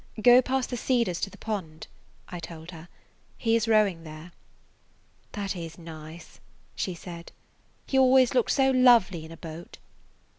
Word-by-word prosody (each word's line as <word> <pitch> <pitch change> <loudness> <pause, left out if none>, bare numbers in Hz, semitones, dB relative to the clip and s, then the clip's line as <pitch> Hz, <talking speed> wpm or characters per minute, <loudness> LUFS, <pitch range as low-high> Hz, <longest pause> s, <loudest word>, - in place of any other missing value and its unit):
"Go 245 +3 +7
past 260 0 -2
the 245 - -2
cedars 235 -8 0
to 195 - -1
the - - -15
pond," 180 -8 -5 0.4
I 175 - -7
told 165 0 -9
her. 165 0 -12 0.5
"He 225 -1 +1
is 230 0 0
rowing 210 -7 +2
there." 155 +2 -11 1.0
"That 200 -2 -3
is 165 -2 -7
nice," 160 -1 -11 0.4
she 185 - -3
said. 170 0 -10 0.5
"He 265 - +1
always 260 -1 +5
looks 245 -3 +2
so 270 -1 +3
lovely 235 -10 +4
in 160 - -12
a 165 - -10
boat." 165 +1 -10
185 Hz, 155 wpm, -26 LUFS, 165-240 Hz, 1.0 s, Go